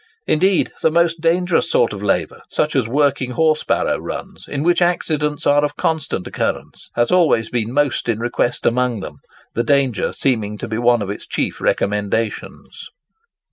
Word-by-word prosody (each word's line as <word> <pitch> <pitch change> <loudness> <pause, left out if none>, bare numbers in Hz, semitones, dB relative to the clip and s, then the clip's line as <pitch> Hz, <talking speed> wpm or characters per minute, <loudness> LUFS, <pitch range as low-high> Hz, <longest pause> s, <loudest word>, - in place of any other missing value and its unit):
Indeed 185 +4 +2
the - - +4
most 165 0 +1
dangerous 170 0 +2
sort 115 - +2
of 100 - -7
labour—such 100 - -1
as 130 -4 +2
working 135 -1 +1
horse 155 +2 +2
barrow - - 0
runs, - - -7
in 140 0 -3
which 175 +1 +2
accidents 155 -4 0
are 145 +1 +4
of 145 0 -1
constant 155 - -2
occurrence—has 120 0 -3
always 160 -11 +3
been 115 -1 -1
most 140 -3 0
in 115 - +1
request 120 +1 -1
amongst 120 -3 +1
them, 75 - -8 0.4
the 115 - 0
danger 135 -3 +1
seeming 110 -6 -1
to - - -6
be 110 +1 -3
one 120 -2 +3
of 100 - -4
its 105 - -8
chief - - -2
recommendations. 105 +2 -2
130 Hz, 160 wpm, -19 LUFS, 115-155 Hz, 0.4 s, the